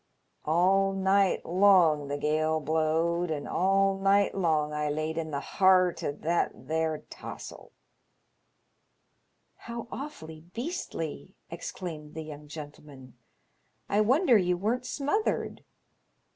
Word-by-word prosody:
All 190 Hz, +5 st, +3 dB
night 195 Hz, 0 st, +2 dB
long 175 Hz, -5 st, +4 dB
the 145 Hz, +1 st, -3 dB
gale 155 Hz, +2 st, +1 dB
blowed, 160 Hz, +3 st, 0 dB
and 150 Hz, -2 st, -3 dB
all 195 Hz, +1 st, +2 dB
night 195 Hz, +1 st, +3 dB
long 155 Hz, -5 st, +1 dB
I 150 Hz, 0 st, -1 dB
laid 155 Hz, +2 st, -2 dB
in 160 Hz, -1 st, -3 dB
the 140 Hz, -2 st, -2 dB
heart 185 Hz, +2 st, +3 dB
o' -, -, 0 dB
that 165 Hz, +4 st, 0 dB, 0.2 s
there 160 Hz, -1 st, -1 dB
taws'l." -, -, -9 dB, 1.9 s
How 235 Hz, 0 st, -7 dB
awfully 160 Hz, -, -8 dB
beastly! 230 Hz, -, -5 dB
" -, -, -33 dB
exclaimed 165 Hz, -3 st, -7 dB
the 160 Hz, -, -5 dB
young 150 Hz, -1 st, -10 dB
gentle 150 Hz, -1 st, -9 dB
man. 130 Hz, -4 st, -13 dB, 0.4 s
" -, -, -44 dB, 0.3 s
I 205 Hz, -, +3 dB
wonder 250 Hz, -, +4 dB
you 180 Hz, -1 st, +1 dB
weren't 240 Hz, +7 st, -1 dB
smothered." 305 Hz, +10 st, -1 dB
170 Hz, 125 wpm, -28 LUFS, 155-195 Hz, 1.9 s, long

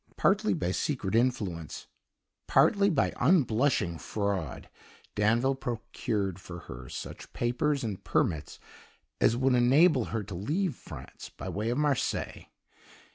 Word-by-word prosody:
Partly 210 Hz, +2 st, +3 dB
by 90 Hz, -, -1 dB
secret 110 Hz, -2 st, -2 dB
influence, 105 Hz, -9 st, -1 dB, 0.6 s
partly 200 Hz, 0 st, +4 dB
by 155 Hz, -7 st, +1 dB
unblushing 125 Hz, -, +2 dB
fraud, 100 Hz, -4 st, -3 dB, 0.5 s
Danville 115 Hz, +6 st, +2 dB
procured 110 Hz, -6 st, -3 dB
for 85 Hz, -1 st, -8 dB
her 60 Hz, -1 st, -9 dB
such -, -, -8 dB
papers 135 Hz, +4 st, 0 dB
and 105 Hz, -5 st, -4 dB
permits 80 Hz, -4 st, 0 dB, 0.6 s
as 115 Hz, -, +3 dB
would 130 Hz, +1 st, +3 dB
enable 130 Hz, +2 st, +5 dB
her 110 Hz, -2 st, -3 dB
to 100 Hz, 0 st, -9 dB
leave 150 Hz, -, -1 dB
France -, -, -10 dB
by -, -, -7 dB
way 105 Hz, +3 st, -2 dB
of 120 Hz, -, 0 dB
Marseilles. 145 Hz, -3 st, -1 dB
120 Hz, 125 wpm, -29 LUFS, 100-140 Hz, 0.6 s, enable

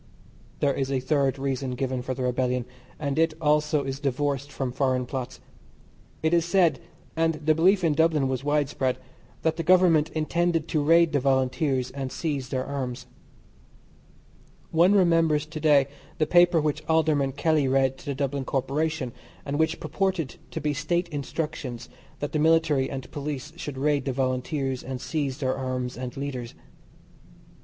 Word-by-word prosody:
There 140 Hz, -1 st, +3 dB
is 135 Hz, 0 st, -2 dB
a 135 Hz, -, +1 dB
third 135 Hz, 0 st, +1 dB
reason 135 Hz, -1 st, -2 dB
given 130 Hz, 0 st, -2 dB
for 130 Hz, +1 st, -4 dB
the 130 Hz, -, -3 dB
rebellion, 125 Hz, -1 st, 0 dB, 0.3 s
and 145 Hz, 0 st, -2 dB
it 165 Hz, -1 st, +2 dB
also 150 Hz, -1 st, +2 dB
is 135 Hz, 0 st, -4 dB
divorced 140 Hz, 0 st, -1 dB
from 130 Hz, -2 st, -3 dB
foreign 130 Hz, -1 st, 0 dB
plots. 130 Hz, 0 st, -5 dB, 0.8 s
It 160 Hz, +1 st, +2 dB
is 170 Hz, -1 st, +4 dB
said, 170 Hz, -6 st, +3 dB, 0.4 s
and 165 Hz, 0 st, +2 dB
the 155 Hz, +1 st, +2 dB
belief 185 Hz, +4 st, +3 dB
in 160 Hz, -3 st, +3 dB
Dublin 155 Hz, -3 st, +2 dB
was 130 Hz, 0 st, -2 dB
widespread, 145 Hz, -3 st, 0 dB, 0.5 s
that 160 Hz, -1 st, +1 dB
the -, -, -1 dB
Government 170 Hz, -3 st, +5 dB
intended 165 Hz, +1 st, 0 dB
to 155 Hz, -4 st, +1 dB
raid 165 Hz, +2 st, +5 dB
the 145 Hz, -, +3 dB
Volunteers 130 Hz, 0 st, +1 dB
and 135 Hz, -2 st, -5 dB
seize 140 Hz, -6 st, -3 dB
their 130 Hz, 0 st, -2 dB
arms. 130 Hz, -3 st, -4 dB, 1.7 s
One 175 Hz, +5 st, +5 dB
remembers 165 Hz, -5 st, +3 dB
to 155 Hz, 0 st, -7 dB
day 145 Hz, -3 st, +5 dB, 0.3 s
the 155 Hz, -, +2 dB
paper 175 Hz, 0 st, +5 dB
which 155 Hz, 0 st, -1 dB
Alderman 155 Hz, -4 st, +2 dB
Kelly 150 Hz, -1 st, +2 dB
read 135 Hz, 0 st, +2 dB
to -, -, -14 dB
the 140 Hz, -, -2 dB
Dublin 140 Hz, 0 st, -2 dB
Corporation, 140 Hz, 0 st, -1 dB, 0.3 s
and 145 Hz, +1 st, -2 dB
which 160 Hz, +1 st, +1 dB
purported 190 Hz, -8 st, -2 dB
to -, -, -4 dB
be 150 Hz, +1 st, -1 dB
State 170 Hz, +5 st, -1 dB
Instructions 145 Hz, -4 st, -4 dB, 0.3 s
that 145 Hz, -, -2 dB
the 155 Hz, -, 0 dB
Military 155 Hz, -4 st, +3 dB
and 135 Hz, -2 st, -6 dB
Police 145 Hz, 0 st, -5 dB
should 145 Hz, -5 st, -6 dB
raid 145 Hz, -1 st, +1 dB
the 135 Hz, -, -1 dB
Volunteers, 130 Hz, +1 st, -1 dB
and 130 Hz, 0 st, -5 dB
seize 140 Hz, -1 st, -2 dB
their 130 Hz, -2 st, -1 dB
arms 130 Hz, -1 st, -3 dB
and 125 Hz, 0 st, -6 dB
leaders. 130 Hz, -4 st, -5 dB
145 Hz, 165 wpm, -26 LUFS, 130-160 Hz, 1.7 s, Government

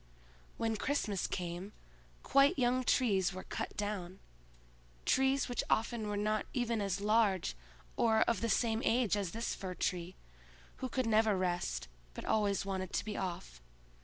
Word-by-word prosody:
When 225 Hz, -1 st, 0 dB
Christmas 210 Hz, -7 st, -1 dB
came, 175 Hz, +3 st, -4 dB, 0.5 s
quite 275 Hz, +1 st, +4 dB
young 255 Hz, 0 st, +2 dB
trees 195 Hz, -8 st, +2 dB
were 185 Hz, -, -6 dB
cut -, -, -5 dB
down; 195 Hz, -3 st, -3 dB, 0.9 s
trees 265 Hz, +1 st, +3 dB
which 245 Hz, -2 st, -1 dB
often 225 Hz, -1 st, +1 dB
were 205 Hz, 0 st, -2 dB
not 215 Hz, +1 st, 0 dB
even 235 Hz, -3 st, 0 dB
as 200 Hz, -1 st, -1 dB
large 205 Hz, -, +2 dB, 0.4 s
or 220 Hz, -1 st, +4 dB
of 230 Hz, -5 st, +2 dB
the 230 Hz, -, 0 dB
same 225 Hz, +1 st, +2 dB
age 230 Hz, -3 st, +3 dB
as 200 Hz, -3 st, -1 dB
this 230 Hz, +5 st, -3 dB
Fir 185 Hz, -2 st, -5 dB
tree, 180 Hz, 0 st, -2 dB, 0.6 s
who 260 Hz, -, -4 dB
could 255 Hz, 0 st, 0 dB
never 220 Hz, -2 st, +3 dB
rest, 180 Hz, -, -1 dB, 0.3 s
but -, -, -6 dB
always 205 Hz, -3 st, +1 dB
wanted 190 Hz, -2 st, -3 dB
to -, -, -1 dB
be 210 Hz, -1 st, -4 dB
off. 170 Hz, -, -5 dB
210 Hz, 155 wpm, -34 LUFS, 185-230 Hz, 0.9 s, quite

